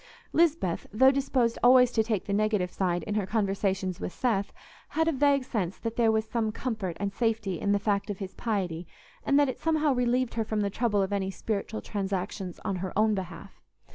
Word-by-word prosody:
Lisbeth, 320 Hz, -, +1 dB
though 260 Hz, +6 st, +6 dB
disposed 265 Hz, -4 st, 0 dB
always 250 Hz, 0 st, +6 dB
to 225 Hz, -, +2 dB
take 215 Hz, -3 st, -1 dB
the 200 Hz, -, -2 dB
negative 210 Hz, -3 st, +1 dB
side 175 Hz, -2 st, -1 dB
in 210 Hz, -, -3 dB
her 205 Hz, -3 st, -1 dB
conversations 195 Hz, -3 st, -1 dB
with -, -, -4 dB
Seth, 205 Hz, -4 st, 0 dB, 0.4 s
had 320 Hz, +1 st, 0 dB
a -, -, +4 dB
vague 280 Hz, -1 st, +3 dB
sense 200 Hz, -8 st, -2 dB
that 230 Hz, -1 st, -4 dB
there 230 Hz, -2 st, +3 dB
was 220 Hz, 0 st, +1 dB
some 220 Hz, -1 st, -1 dB
comfort 215 Hz, -8 st, -4 dB
and 200 Hz, 0 st, -2 dB
safety 220 Hz, -6 st, -1 dB
in 200 Hz, -, 0 dB
the 205 Hz, -, +4 dB
fact 200 Hz, 0 st, -1 dB
of 205 Hz, -, -3 dB
his 190 Hz, -1 st, -6 dB
piety, 180 Hz, -7 st, -2 dB, 0.4 s
and 280 Hz, 0 st, +3 dB
that 290 Hz, -, +4 dB
it 260 Hz, -, -4 dB
somehow 310 Hz, -3 st, +2 dB
relieved 250 Hz, 0 st, +1 dB
her 225 Hz, -, 0 dB
from 215 Hz, -1 st, -1 dB
the 200 Hz, -1 st, -1 dB
trouble 210 Hz, -2 st, +1 dB
of 190 Hz, +1 st, -3 dB
any 195 Hz, -1 st, -1 dB
spiritual 215 Hz, +2 st, -3 dB
transactions 195 Hz, -2 st, -3 dB
on 195 Hz, -, -1 dB
her 185 Hz, 0 st, -4 dB
own 215 Hz, 0 st, +4 dB
behalf. 190 Hz, 0 st, -7 dB
215 Hz, 205 wpm, -28 LUFS, 195-240 Hz, 0.4 s, though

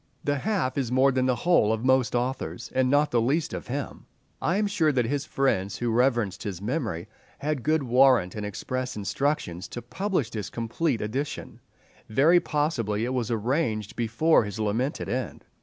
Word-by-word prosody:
The 145 Hz, -1 st, 0 dB
half 190 Hz, -9 st, 0 dB
is 125 Hz, -3 st, -2 dB
more 130 Hz, +2 st, +4 dB
than 130 Hz, 0 st, +1 dB
the 130 Hz, -, +2 dB
whole 120 Hz, -4 st, +3 dB
of 110 Hz, +2 st, -1 dB
most 130 Hz, -3 st, +3 dB
authors, 120 Hz, -1 st, -3 dB
and 130 Hz, -1 st, +2 dB
not 145 Hz, +2 st, +3 dB
the 120 Hz, -, +3 dB
least 140 Hz, +7 st, 0 dB
of -, -, -6 dB
him. 135 Hz, +3 st, -5 dB, 0.3 s
I 175 Hz, +4 st, +1 dB
am 210 Hz, -, +2 dB
sure 165 Hz, -7 st, +2 dB
that 125 Hz, -4 st, +1 dB
his 145 Hz, +4 st, -1 dB
friends 100 Hz, -10 st, 0 dB
who 120 Hz, 0 st, -1 dB
reverenced 120 Hz, -6 st, +1 dB
his 100 Hz, -5 st, -4 dB
memory 110 Hz, -, -3 dB, 0.3 s
had 150 Hz, -2 st, -2 dB
good 155 Hz, +2 st, +1 dB
warrant 125 Hz, -7 st, +4 dB
and 105 Hz, -, -5 dB
express 130 Hz, +5 st, -4 dB
instructions 105 Hz, -, -2 dB
to -, -, -6 dB
publish 165 Hz, -, -2 dB
this 105 Hz, -4 st, -4 dB
complete 120 Hz, +3 st, -1 dB
edition—very 140 Hz, +4 st, -1 dB
possibly 120 Hz, -, -1 dB
it 125 Hz, -, -2 dB
was 125 Hz, -3 st, -1 dB
arranged 115 Hz, -2 st, -1 dB
before 120 Hz, +7 st, +3 dB
his 105 Hz, +1 st, -6 dB
lamented 110 Hz, +7 st, -1 dB
end. 120 Hz, -, -4 dB
125 Hz, 175 wpm, -26 LUFS, 110-145 Hz, 0.3 s, more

